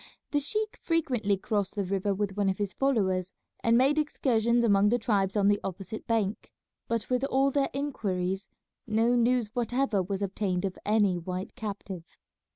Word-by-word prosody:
The 290 Hz, -, +2 dB
sheik 430 Hz, +9 st, -1 dB
frequently 250 Hz, -, +1 dB
crossed 205 Hz, +1 st, -2 dB
the 205 Hz, -, 0 dB
river 195 Hz, +2 st, 0 dB
with 195 Hz, 0 st, -2 dB
one 200 Hz, -1 st, +1 dB
of 190 Hz, -, -1 dB
his 200 Hz, -2 st, -2 dB
followers 190 Hz, -9 st, 0 dB, 0.3 s
and 230 Hz, 0 st, +4 dB
made 275 Hz, +4 st, +4 dB
excursions 235 Hz, -5 st, +2 dB
among 205 Hz, -2 st, +4 dB
the 240 Hz, -, +3 dB
tribes 205 Hz, -4 st, 0 dB
on 200 Hz, -1 st, +3 dB
the 205 Hz, 0 st, +3 dB
opposite 195 Hz, +3 st, -6 dB
bank, 220 Hz, -3 st, -1 dB, 0.4 s
but 230 Hz, -2 st, -1 dB
with 250 Hz, +1 st, +1 dB
all 275 Hz, 0 st, +2 dB
their 275 Hz, 0 st, +1 dB
inquiries 195 Hz, -9 st, -2 dB, 0.4 s
no 225 Hz, +2 st, +2 dB
news 240 Hz, -2 st, +2 dB
whatever 245 Hz, -3 st, +1 dB
was 195 Hz, +2 st, -3 dB
obtained 195 Hz, -2 st, -1 dB
of 190 Hz, -, -4 dB
any 205 Hz, -4 st, +3 dB
white 185 Hz, +3 st, -5 dB
captive. 195 Hz, -5 st, -7 dB
210 Hz, 165 wpm, -28 LUFS, 195-245 Hz, 0.4 s, and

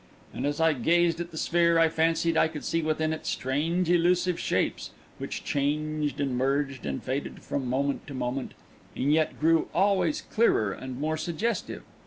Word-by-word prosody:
And 135 Hz, -, -2 dB
as 145 Hz, +1 st, -2 dB
I 160 Hz, -1 st, +4 dB
gazed 170 Hz, +5 st, +2 dB
at 175 Hz, 0 st, -4 dB
the 160 Hz, -, -10 dB
sphere, 170 Hz, +1 st, +3 dB
I 165 Hz, 0 st, +5 dB
fancied 165 Hz, +1 st, +1 dB
I -, -, +4 dB
could 155 Hz, -2 st, -7 dB
see 165 Hz, -, 0 dB
within 155 Hz, 0 st, 0 dB
it 160 Hz, -, -7 dB
strange, 160 Hz, +7 st, 0 dB
elusive 175 Hz, +1 st, +2 dB
shapes, -, -, -1 dB, 0.3 s
which -, -, -5 dB
changed 150 Hz, +1 st, -1 dB
and 135 Hz, -3 st, 0 dB
merged 135 Hz, -, -1 dB
and 70 Hz, -, -3 dB
faded 135 Hz, +2 st, -4 dB
from 135 Hz, -3 st, -3 dB
moment 140 Hz, +3 st, -1 dB
to 140 Hz, -, -7 dB
moment, 130 Hz, +1 st, -3 dB, 0.4 s
and 140 Hz, +3 st, +1 dB
yet 155 Hz, 0 st, +1 dB
grew 160 Hz, +1 st, +3 dB
always 200 Hz, -, +2 dB
clearer 115 Hz, -, +2 dB
and 130 Hz, +4 st, -7 dB
more 155 Hz, +2 st, -1 dB
suggestive. 175 Hz, +9 st, -3 dB
155 Hz, 175 wpm, -27 LUFS, 140-170 Hz, 0.4 s, I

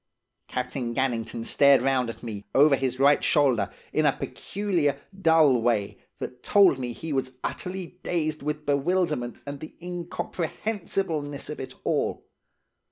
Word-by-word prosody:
"Captain 125 Hz, -1 st, -3 dB
Gannington 115 Hz, -3 st, -1 dB
stared 140 Hz, -2 st, +5 dB
round 130 Hz, -3 st, +2 dB
at 115 Hz, -, -8 dB
me, 105 Hz, -4 st, -6 dB
over 145 Hz, +1 st, +6 dB
his 130 Hz, -1 st, -2 dB
right 140 Hz, +1 st, +5 dB
shoulder, 130 Hz, -9 st, +3 dB, 0.2 s
in -, -, +2 dB
a -, -, +5 dB
peculiar, 175 Hz, -9 st, -2 dB, 0.2 s
dull 160 Hz, -7 st, +5 dB
way, 110 Hz, -4 st, 0 dB, 0.2 s
that 125 Hz, 0 st, -7 dB
told 195 Hz, -9 st, +5 dB
me 125 Hz, -1 st, -3 dB
he 155 Hz, +6 st, -5 dB
was 130 Hz, -1 st, -1 dB
utterly 180 Hz, -2 st, -5 dB
dazed 155 Hz, -3 st, -1 dB
with 150 Hz, +1 st, -3 dB
bewilderment 145 Hz, -3 st, 0 dB
and 140 Hz, 0 st, -6 dB
the 155 Hz, -, -10 dB
incomprehensibleness 175 Hz, -3 st, -3 dB
of 150 Hz, -, -7 dB
it 130 Hz, -, -7 dB
all. -, -, -1 dB
140 Hz, 140 wpm, -26 LUFS, 125-165 Hz, 0.2 s, over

